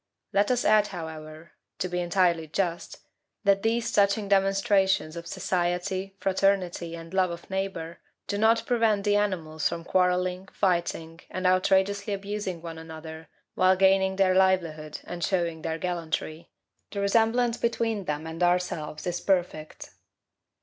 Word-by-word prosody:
Let 200 +1 +3
us 250 -1 +1
add, 215 -1 +5
however, 160 -2 -8 0.3
to 185 - -2
be 180 0 -2
entirely 175 -2 +1
just 170 +1 -3 0.4
that 200 -1 +3
these 225 +2 0
touching 200 +1 +2
demonstrations 195 -3 +2
of 170 0 -7
society, 185 +3 -2
fraternity, 185 -3 0
and 165 +1 -10
love 190 -1 +2
of 170 0 -8
neighbor, 190 -4 -4 0.3
do 205 - -3
not 225 +1 +3
prevent 225 -5 +2
the 205 0 +2
animals 170 -7 0
from 170 0 -5
quarrelling, 180 +1 +1
fighting, 170 -3 -1
and 185 0 -4
outrageously 195 +2 +2
abusing 200 -3 -5
one 165 -1 -7
another 160 0 -9 0.3
while 185 0 +4
gaining 190 0 +3
their 190 -1 +3
livelihood 170 -5 +1
and 175 -1 -6
showing 170 -3 0
their 160 0 -3
gallantry; 165 -2 -4 0.4
the 200 - -5
resemblance 230 +4 +2
between 225 -3 -1
them 150 0 -3
and 160 +1 -7
ourselves 175 -4 0
is 175 -1 -2
perfect. 175 -5 -2
185 Hz, 140 wpm, -27 LUFS, 170-200 Hz, 0.4 s, add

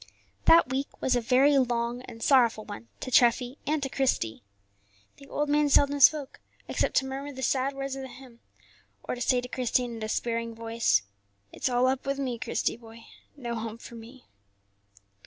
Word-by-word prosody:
That 335 -4 +7
week 270 +2 -4
was 260 - +1
a 245 - +1
very 270 +4 +4
long 240 -1 -1
and 225 0 -9
sorrowful 235 -5 +3
one 205 +2 -9
to 255 - -5
Treffy 245 +2 +3
and 300 -1 0
to - - 0
Christie. 245 - -1 0.8
The 275 - -15
old 295 +2 -2
man 295 0 +2
seldom 285 +1 +3
spoke, 285 0 +4 0.3
except - - -1
to 265 - +3
murmur 270 +2 -5
the 265 -1 -7
sad 270 +2 0
words 275 0 -4
of 270 - -6
the 265 - -6
hymn, 250 -2 -14 0.6
or - - -3
to 245 - -6
say 250 0 +2
to 250 - -7
Christie 250 0 0
in 235 -1 -7
a - - -8
despairing 230 +1 -2
voice, 230 - +1 0.5
"It's - - -2
all 245 0 +2
up 265 +1 0
with 275 0 -1
me, 255 -4 -3
Christie, - - -1
boy; 230 -1 -14 0.3
no 240 -4 -5
home 225 -1 -5
for 235 - -12
me." 235 +3 -12
250 Hz, 190 wpm, -27 LUFS, 235-275 Hz, 0.8 s, That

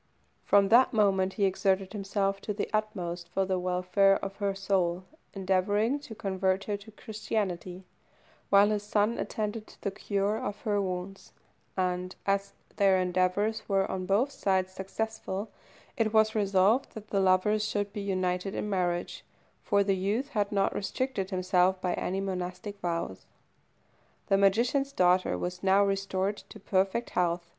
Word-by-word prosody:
From 200 -1 +4
that 245 +3 +6
moment 190 -3 +2
he 205 - +1
exerted 190 0 +1
himself 195 -1 -1
to 210 - -4
the 205 - -2
utmost 180 -5 -2
for 195 +2 0
the 185 -1 0
welfare 185 +2 +3
of 195 0 -6
her 200 -1 -1
soul, 190 -2 0 0.3
endeavouring 205 +7 +1
to 255 -6 -10
convert 190 -1 0
her 205 - -2
to 205 +2 -14
Christianity, 195 -4 -4 0.7
while 200 +1 +6
his 210 -1 0
son 210 +2 0
attended 215 0 -3
to - - -18
the 200 - -2
cure 200 +2 -1
of 205 0 -5
her 205 -3 0
wounds; 185 +1 -5 0.4
and, 180 0 -1
as 200 0 0 0.2
their 195 -2 +4
endeavours 185 +4 +1
were 195 -1 +2
on 185 -1 -3
both 230 +8 +2
sides 190 -5 0
successful, 205 +1 -4 0.4
it 220 -2 +1
was 220 0 +4
resolved 200 +4 +2
that 215 -1 -9
the 200 - +2
lovers 190 +3 +3
should 205 -1 -2
be 205 - -4
united 185 -1 -1
in - - -2
marriage, 180 -3 -1 0.4
for 200 -1 +2
the 195 -1 +1
youth 210 +9 -1
had 205 -6 -1
not 195 -1 +1
restricted 205 0 -2
himself 185 0 +2
by 180 -1 -1
any 190 +1 -2
monastic 190 +1 -4
vows. 170 - -3 1.0
The 195 - +4
magician's 240 +8 +2
daughter 180 -6 +3
was 180 0 -4
now 195 +1 +4
restored 195 0 -1
to - - -13
perfect 195 +5 0
health. 175 -1 0
195 Hz, 155 wpm, -29 LUFS, 185-210 Hz, 1.0 s, that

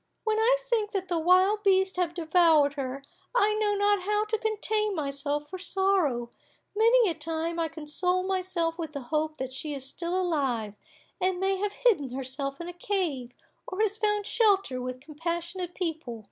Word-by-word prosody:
When 435 0 +1
I - - +4
think 460 -4 -1
that 380 -3 -2
the 345 -2 +1
wild 370 +5 +4
beasts 380 -2 +3
have 345 -2 0
devoured 320 -4 +4
her, 275 -1 -4 0.3
I 425 -3 +4
know 425 -1 +1
not 405 -1 +3
how 420 +3 0
to 440 +1 -1
contain 425 -1 0
myself 285 0 -2
for 370 +4 -7
sorrow; 365 -12 +1 0.4
many 460 +2 +5
a 345 - +1
time 325 +2 -3
I 330 - +1
console 325 +4 -1
myself 365 -3 -1
with 320 -3 -4
the 280 - -4
hope 310 0 0
that 260 -1 -5
she 290 +2 -5
is 270 -1 -5
still 345 +6 -2
alive, 270 - -1 0.5
and 370 0 +1
may 385 0 +1
have 410 +1 -2
hidden 310 - +4
herself 270 +1 -4
in 340 - -6
a 350 - -6
cave, 340 - -2 0.3
or 375 - -6
has 425 -1 +2
found 420 -1 0
shelter 395 - +2
with 255 0 -5
compassionate 340 +4 -4
people. 320 -10 -3
350 Hz, 175 wpm, -28 LUFS, 295-400 Hz, 0.5 s, many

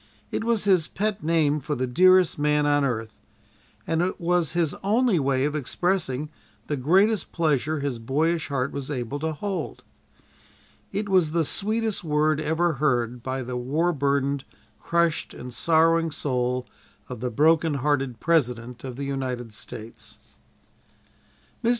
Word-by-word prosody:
It - - -2
was 230 -2 +1
his 185 -6 +3
pet 210 0 -2
name 155 -2 +2
for 150 +2 -3
the 130 - -1
dearest 185 +6 +4
man 150 0 +2
on 145 -1 +3
earth, 115 -4 -3 0.6
and 165 0 0
it 180 +1 -1
was 175 -2 +1
his 170 -4 +1
only 215 -1 +3
way 135 -1 +1
of 150 +1 -1
expressing 150 -1 -1 0.3
the 150 - -2
greatest 190 - +2
pleasure 155 -2 0
his 135 -4 -2
boyish 155 +8 0
heart 140 -2 -1
was 140 -1 -5
able 135 0 -3
to 160 +2 -1
hold. 195 +5 -4 1.1
It 205 0 -2
was 180 -5 +2
the 165 -2 +2
"sweetest 215 +4 -1
word 155 -1 +2
ever 160 +2 +1
heard" 125 -4 +1
by 130 +1 -3
the 125 +1 -5
war 155 +8 0
burdened, 140 -1 0 0.4
crushed 170 -2 0
and 125 0 -8
sorrowing 165 +4 +3
soul 125 -4 -1 0.4
of - - -7
the 125 +2 -2
broken 155 +5 +3
hearted 135 -3 0
President 125 -7 0
of 130 -2 -6
the 140 +2 -4
United 130 -4 -3
States. 110 +2 -10 1.5
Mr. 230 - +3
150 Hz, 150 wpm, -25 LUFS, 130-170 Hz, 1.5 s, dearest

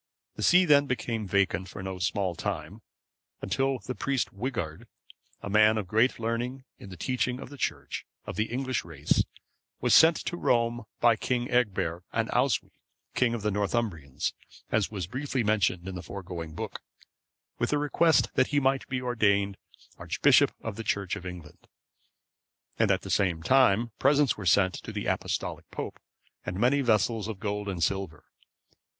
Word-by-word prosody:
The - - -7
see 180 +1 +6
then 145 -3 +5
became 115 -4 -2
vacant 95 -2 +1
for 95 - -8
no 95 -1 -5
small 95 0 0
time, 95 +2 -5 0.6
until, 135 0 0
the 120 +2 -6
priest 135 0 -1
Wighard,(519) 100 - -4 0.6
a - - -4
man 110 +1 +5
of 105 -4 -3
great 110 +6 +2
learning 120 +3 -3 0.2
in 100 - -10
the 90 - -9
teaching 125 +1 -1
of - - -8
the 145 - -11
Church, - - -3 0.2
of - - -6
the 110 - +1
English 130 +2 -2
race, 80 -3 0 0.6
was - - +2
sent 160 0 +7
to 175 - -3
Rome 120 -5 +1
by 120 -1 +5
King 120 +2 -2
Egbert 95 -8 0
and 115 0 -1
Oswy, 125 +2 +1 0.4
king 120 -2 +2
of 110 - -6
the 105 - +1
Northumbrians, 100 - -1 0.4
as 110 -3 +2
was 95 -5 -4
briefly 130 - -2
mentioned 100 -4 +1
in 95 - -4
the 90 - -5
foregoing 85 -4 -7
book,(520) - - -11
with 120 - 0
a 150 - +2
request 150 +2 +3
that 130 - +3
he 145 - +2
might 135 0 +1
be 125 -1 -2
ordained 100 -5 +2 0.4
Archbishop - - +4
of 110 -3 -5
the 115 - -4
Church 100 -3 -1
of 95 -2 -7
England; 85 -4 -10 1.1
and - - +3
at - - +2
the - - -6
same 85 -4 +1
time 120 -1 +4
presents 140 0 +4
were 100 -4 -5
sent 95 0 +4
to - - -7
the - - -4
Apostolic - - -2
pope, - - -6 0.4
and 90 +1 -4
many 130 +5 +3
vessels 110 -2 +1
of 110 -4 -6
gold 105 -2 -3
and 90 -4 -2
silver. 95 -5 -2
110 Hz, 170 wpm, -28 LUFS, 95-125 Hz, 1.1 s, sent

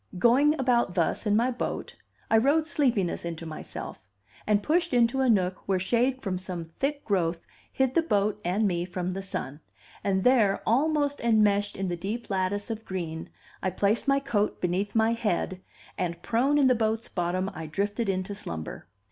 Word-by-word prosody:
Going 270 - +4
about 240 -8 +2
thus 175 +5 0
in 205 - +3
my 240 +4 +2
boat, 245 - -4 0.4
I 225 - +6
rowed 290 +6 +3
sleepiness 245 - +1
into 170 -1 -5
myself, 155 -9 -8 0.4
and 210 -1 +2
pushed 335 - +1
into 240 +2 +3
a 260 - +3
nook 185 -4 +2
where 195 -1 +2
shade 245 +7 +1
from 185 -2 -2
some 180 -3 -5
thick 275 - -3
growth 170 -4 0 0.3
hid 265 -1 +1
the 335 - +4
boat 210 -8 0
and 200 +5 +1
me 175 -2 0
from 180 0 -3
the 195 - -4
sun; 150 -7 -5 0.4
and 190 -1 +1
there, 230 -6 +3
almost 285 +3 +1
enmeshed 210 -3 +2
in 195 0 -2
the 175 - -1
deep 205 +7 -5
lattice 195 +3 -1
of 220 0 -5
green, 165 -5 -5 0.3
I 185 - 0
placed 205 +7 0
my 275 0 +4
coat 215 -6 -1
beneath 185 +4 -1
my 225 +1 +3
head, 190 -5 -1 0.4
and 170 -2 -2
prone 265 +6 +2
in 285 - +4
the 255 - +6
boat's 220 -1 -1
bottom 185 +2 -1
I 160 0 -6
drifted 205 +6 -1
into 185 +1 -2
slumber. 80 - -5
205 Hz, 180 wpm, -27 LUFS, 185-245 Hz, 0.4 s, I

